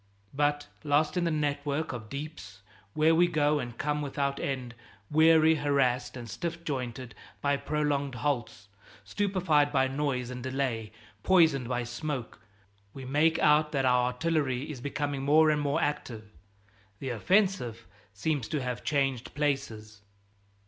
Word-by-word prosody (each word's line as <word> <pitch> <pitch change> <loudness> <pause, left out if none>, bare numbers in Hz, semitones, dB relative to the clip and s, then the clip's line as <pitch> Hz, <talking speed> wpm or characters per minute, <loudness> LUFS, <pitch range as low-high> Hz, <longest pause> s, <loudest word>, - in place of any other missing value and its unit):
But, 145 +1 +1 0.2
lost 150 +3 +2
in 175 -1 +1
the - - +2
network 145 0 -1
of 110 -3 -7
deeps 140 -10 -8 0.3
where 155 +1 +4
we 175 +2 +5
go 150 -2 +2
and 120 -3 -6
come 150 +1 -1
without 140 -1 -2
end, 130 -3 -3 0.4
weary, 160 +1 +6
harassed 130 -4 0
and 120 -1 -7
stiff 170 +7 -5
jointed 125 -5 -4 0.3
by 140 0 +1
prolonged 145 -2 -1
halts, 120 -6 -2 0.4
stupefied 170 - +1
by 135 -2 +3
noise 130 -3 -2
and 125 0 -6
delay, 130 -4 -2 0.3
poisoned 160 - +3
by 125 -1 -1
smoke, 120 +1 -5 0.6
we 135 -1 -8
make 155 +5 +2
out 150 0 +4
that 135 -2 +1
our 125 -1 +4
artillery 140 0 -1
is 130 -5 -8
becoming 145 0 -3
more 155 +3 +5
and 150 -1 0
more 145 -1 0
active; 115 -7 -3 0.7
the 135 - -5
offensive 125 - +1 0.3
seems 125 +5 -2
to 155 - -2
have 125 -2 -4
changed 135 -4 -1
places. 110 -8 -2
140 Hz, 140 wpm, -29 LUFS, 125-150 Hz, 0.7 s, weary